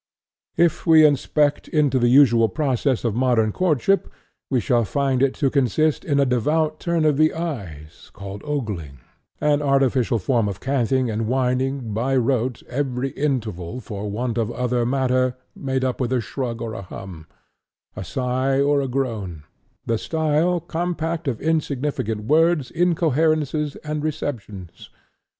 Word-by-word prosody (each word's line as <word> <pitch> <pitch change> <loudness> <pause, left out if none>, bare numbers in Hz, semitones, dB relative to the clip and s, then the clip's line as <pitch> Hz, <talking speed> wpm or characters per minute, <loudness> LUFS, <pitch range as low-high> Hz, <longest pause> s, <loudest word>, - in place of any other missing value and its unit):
If 170 -1 +2
we 160 -1 +7
inspect 145 0 +1
into 145 -4 +2
the 120 - +3
usual 120 -3 +5
process 135 -4 0
of 115 -3 0
modern 120 -2 +2
courtship, 185 - +1 0.4
we 130 - +2
shall 120 +1 +2
find 135 +3 0
it 135 -1 +2
to 140 -4 0
consist 140 +3 +1
in 145 -3 +1
a 140 - +4
devout 150 +5 0
turn 170 -2 0
of 150 -2 +3
the 155 +1 +3
eyes, 95 - -6
called 100 0 -8
ogling; 105 - -4 0.4
an 150 -1 +2
artificial 135 -4 +2
form 115 +2 +1
of 100 - -6
canting 130 -2 0
and 110 +1 -2
whining, 130 -1 -1
by 125 +5 0
rote, 125 -1 0
every 130 0 -2
interval, 115 - -3
for 105 -4 -6
want 120 +3 -2
of 115 -1 0
other 125 -1 0
matter, 130 -1 +1 0.2
made 130 -1 -2
up 130 +1 -2
with 125 -1 -1
a 130 - +2
shrug, 120 -1 -4
or 115 -1 -4
a 110 - -6
hum; 90 -3 -10 0.7
a 95 - -5
sigh 130 +6 -1
or 140 0 +3
a 135 - -2
groan; 110 - -3 0.4
the 115 -1 0
style 160 +2 +1
compact 170 -1 -3
of 120 -5 -1
insignificant 145 -8 -1
words, 155 +2 +2
incoherences, 155 -3 +1
and 150 -1 -3
repetitions. 115 - -5
130 Hz, 150 wpm, -22 LUFS, 115-150 Hz, 0.7 s, we